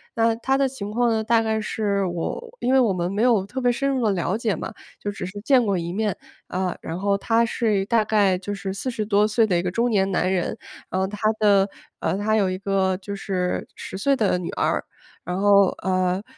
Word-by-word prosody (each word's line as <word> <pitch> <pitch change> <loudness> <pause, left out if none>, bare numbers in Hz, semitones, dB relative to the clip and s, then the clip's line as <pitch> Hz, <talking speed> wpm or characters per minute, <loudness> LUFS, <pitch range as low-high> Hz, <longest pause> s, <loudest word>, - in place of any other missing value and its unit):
那 225 0 +3
他 265 +4 0
的 275 -1 +2
情 210 -6 -6
况 240 +2 +2
呢， 220 -1 0
大 230 0 +3
概 220 -1 0
是 205 -2 -1
我 460 - -5
因 255 - +1
为 265 - +6
我 235 -5 +3
们 175 0 -2
没 205 +3 -1
有 230 -6 +3
特 255 +6 -5
别 245 -1 +3
深 275 +3 -1
入 260 -3 0
地 - - +3
了 180 +2 -1
解 225 -4 0
嘛， 195 - -6 0.3
就 205 - -3
只 200 - -6
是 190 +3 -7
见 250 +1 +4
过 200 -2 +1
一 170 0 -3
面， 210 -1 -1 0.3
呃， 185 -1 -2
然 165 +2 -5
后 200 0 +1
他 230 +3 +2
是 220 -3 0
一 - - -3
大 225 +1 +2
概 205 -4 +2
就 205 +2 -5
是 190 0 -4
40 220 +1 -3
多 205 0 +3
岁 220 +1 +3
的 180 -4 +2
一 - - +1
个 180 - -1
中 235 +5 +1
年 195 -3 +2
男 185 0 +1
人， 180 -2 -1 0.3
然 185 - -1
后 190 - +1
他 205 +1 -8 0.2
的， 200 -2 +4 0.3
呃， 180 +4 -1
他 215 +2 +1
有 200 -3 +2
一 185 - -2
个 190 -1 0
就 200 +1 -6
是 185 -2 -2
10 - - -7
岁 275 +8 +2
的 205 -6 +1
女 175 - -5
儿， - - 0 0.4
然 180 +3 -3
后， 200 -1 +5 0.2
呃， 185 +1 0
205 Hz, 250 characters per minute, -23 LUFS, 190-225 Hz, 0.4 s, 为